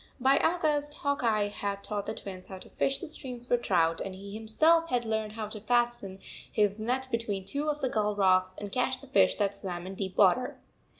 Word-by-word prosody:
By 265 +2 +4
August, 300 -4 +1
Hawk 285 -2 -1
Eye 215 -3 +2
had 200 -1 -4
taught 205 -2 -3
the 220 - -3
Twins 185 -2 -8
how 190 - -8
to - - -13
fish 270 - 0
the 350 - -7
streams 250 -5 -6
for 245 - +3
trout, 165 -8 +1
and 190 -1 -5
he 200 +1 -9
himself 315 +10 +3
had 245 -1 0
learned 220 -1 -2
how 215 -1 -4
to 215 - -7
fasten 240 -4 +1 0.3
his 210 -1 +1
net 255 +4 -1
between 210 -5 -2
two 290 +7 -2
of 300 0 -2
the 265 - +1
gull 210 -2 0
rocks 185 -2 +3
and 205 -1 -6
catch 255 +2 0
the 275 - -12
fish 270 - +4
that 200 -2 0
swam 180 -3 -5
in 190 - -6
deep 190 -1 -5
water. 210 +6 +4
220 Hz, 220 wpm, -29 LUFS, 200-255 Hz, 0.3 s, By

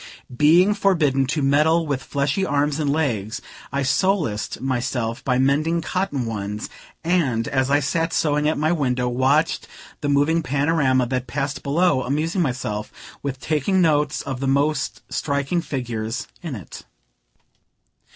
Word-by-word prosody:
Being 170 +9 +5
forbidden 155 - +2
to 145 +1 -1
meddle 155 +4 +3
with 140 -3 -2
fleshly 140 +7 -1
arms 145 -3 0
and 145 -2 +1
legs, 120 -9 -1 0.3
I 140 +1 -1
solaced 150 - 0
myself 125 -3 -2
by 125 -2 +1
mending 150 +6 +2
cotton 155 -8 -1
ones, 105 -1 -4 0.3
and, 145 -10 +1
as 130 -1 0
I 145 +1 +3
sat 165 +4 0
sewing 150 -2 +1
at 155 - -1
my 155 +2 +1
window, 125 -6 0
watched 130 +6 +1 0.3
the 145 - -2
moving 145 +4 +3
panorama 140 -3 +2
that 125 +1 -2
passed 140 +1 -3
below; 150 -1 +2
amusing 155 +8 -1
myself 120 -7 -2 0.3
with 135 -2 -4
taking 155 +7 0
notes 150 -4 +2
of 130 -2 -4
the 135 - -2
most 145 +2 0
striking 140 +4 -1
figures 120 -5 -4
in 165 -7 -5
it. 95 -7 -10
140 Hz, 140 wpm, -22 LUFS, 130-160 Hz, 0.3 s, Being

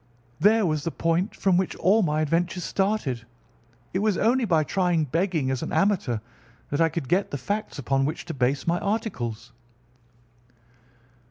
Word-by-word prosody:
There 210 +4 +4
was 155 -3 0
the 165 - -1
point 165 +4 0
from 190 -3 +2
which 185 0 0
all 200 +6 +3
my 155 -4 +1
adventures 170 +3 0
started. 190 - -1 0.7
It 185 - +1
was 210 -2 +1
only 240 +3 +2
by 165 -6 +3
trying 175 0 +1
begging 160 -2 0
as 130 - -2
an - - -4
amateur 195 - +1 0.5
that 145 - 0
I 165 - +4
could 160 -4 -4
get 190 +6 +1
the 140 - -3
facts 205 +10 -3
upon 135 0 +1
which 150 - -3
to 165 - -5
base 130 +1 0
my 170 +1 +1
articles. 125 - -3
170 Hz, 165 wpm, -25 LUFS, 145-195 Hz, 0.7 s, There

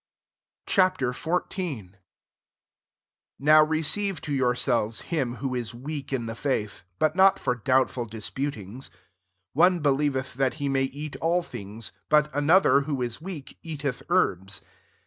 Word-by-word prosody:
Ch. - - -1
XIV. 175 - 0
I - - -29 1.4
NOW 155 +2 +6
receive 160 +4 +1
to 145 - -4
yourselves 125 -4 +1
him 135 -8 -2
who 130 +2 -3
is 120 -2 -3
weak 140 +3 -6
in 125 -4 -1
the 115 - -4
faith; 115 -5 -2 0.2
but 155 - +1
not 190 +1 +6
for 125 - 0
doubt 130 +2 +2
ful 120 -2 -4
disputings. 115 +1 -5
^ - - -32 0.6
One 175 +4 +4
believeth 140 -2 +1
that 130 +1 0
he 145 -2 -3
may 135 -1 +2
eat 145 +2 -6
all 175 +2 +1
things: 110 -4 -7 0.2
but 150 0 +3
another, 145 +1 +4
who 140 -4 -2
is 120 +4 -2
weak, 165 -6 -8
eateth 145 -5 -4
kerbs. 95 - +1
140 Hz, 145 wpm, -26 LUFS, 125-155 Hz, 1.4 s, NOW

